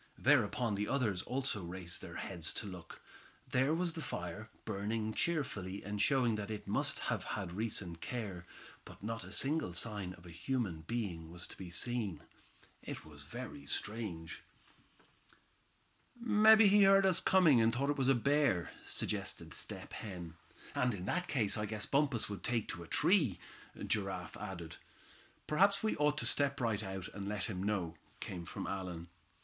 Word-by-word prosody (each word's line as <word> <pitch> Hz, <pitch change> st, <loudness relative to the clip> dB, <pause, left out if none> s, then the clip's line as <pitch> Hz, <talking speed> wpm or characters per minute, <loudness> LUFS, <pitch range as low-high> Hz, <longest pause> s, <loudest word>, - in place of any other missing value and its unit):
Thereupon 120 Hz, -4 st, +3 dB
the 105 Hz, +1 st, -1 dB
others 110 Hz, -10 st, +1 dB
also 130 Hz, -4 st, -1 dB
raised 90 Hz, 0 st, -3 dB
their -, -, -8 dB
heads 85 Hz, -4 st, -2 dB
to -, -, -4 dB
look. 90 Hz, -4 st, -9 dB, 0.5 s
There 130 Hz, +2 st, +3 dB
was 170 Hz, 0 st, +1 dB
the 160 Hz, -, -5 dB
fire, 100 Hz, -, -5 dB, 0.2 s
burning 110 Hz, +1 st, -1 dB
cheerfully, 100 Hz, -, -1 dB
and 105 Hz, +1 st, -2 dB
showing 130 Hz, -5 st, +4 dB
that 100 Hz, -1 st, -4 dB
it 105 Hz, -1 st, -5 dB
must -, -, +1 dB
have -, -, -1 dB
had 95 Hz, -4 st, -4 dB
recent 95 Hz, -4 st, -3 dB
care. 105 Hz, -8 st, -4 dB, 0.4 s
But -, -, -13 dB
not 115 Hz, +1 st, -3 dB
a -, -, -10 dB
single 145 Hz, -, +1 dB
sign 100 Hz, -1 st, -2 dB
of 85 Hz, -, -17 dB
a 85 Hz, -, -10 dB
human 85 Hz, -1 st, -2 dB
being 95 Hz, -9 st, -3 dB
was 90 Hz, +1 st, -4 dB
to -, -, -7 dB
be 95 Hz, -2 st, -8 dB
seen. 105 Hz, -3 st, -2 dB, 0.6 s
It -, -, -7 dB
was 75 Hz, -2 st, -12 dB
very 125 Hz, -, -8 dB
strange. 100 Hz, -7 st, -4 dB, 1.8 s
"Mebbe 220 Hz, -1 st, +7 dB
he 205 Hz, -1 st, +7 dB
heard 195 Hz, 0 st, +7 dB
us 185 Hz, -1 st, +4 dB
coming, 165 Hz, -10 st, +6 dB
and 115 Hz, 0 st, +4 dB
thought 140 Hz, +4 st, +1 dB
it 145 Hz, -, -2 dB
was 135 Hz, 0 st, +3 dB
a 135 Hz, -, +6 dB
bear," 140 Hz, -, +2 dB
suggested -, -, -2 dB
Step -, -, -5 dB
Hen. 90 Hz, -6 st, -6 dB, 0.4 s
"And 125 Hz, -3 st, +1 dB
in 90 Hz, -2 st, -6 dB
that 180 Hz, -, 0 dB
case 115 Hz, -6 st, +2 dB
I 105 Hz, -, -1 dB
guess 105 Hz, 0 st, -3 dB
Bumpus 140 Hz, -5 st, +2 dB
would 100 Hz, -1 st, -6 dB
take 115 Hz, -3 st, 0 dB
to 85 Hz, -, -4 dB
a 85 Hz, -, -9 dB
tree," 150 Hz, -, +4 dB, 0.5 s
Giraffe 95 Hz, -4 st, -1 dB
added. 85 Hz, -6 st, -6 dB, 0.7 s
"Perhaps 200 Hz, +6 st, +4 dB
we 220 Hz, -, +2 dB
ought 150 Hz, 0 st, +3 dB
to -, -, -1 dB
step 140 Hz, -1 st, +2 dB
out 135 Hz, -, -8 dB
right 110 Hz, -3 st, +1 dB
away, 95 Hz, -2 st, -4 dB
and 100 Hz, -1 st, -4 dB
let 105 Hz, -2 st, -2 dB
him 95 Hz, -5 st, -3 dB
know," 95 Hz, -5 st, 0 dB, 0.3 s
came 85 Hz, -2 st, -5 dB
from -, -, -5 dB
Allan. 90 Hz, -3 st, -4 dB
105 Hz, 170 wpm, -35 LUFS, 90-135 Hz, 1.8 s, Mebbe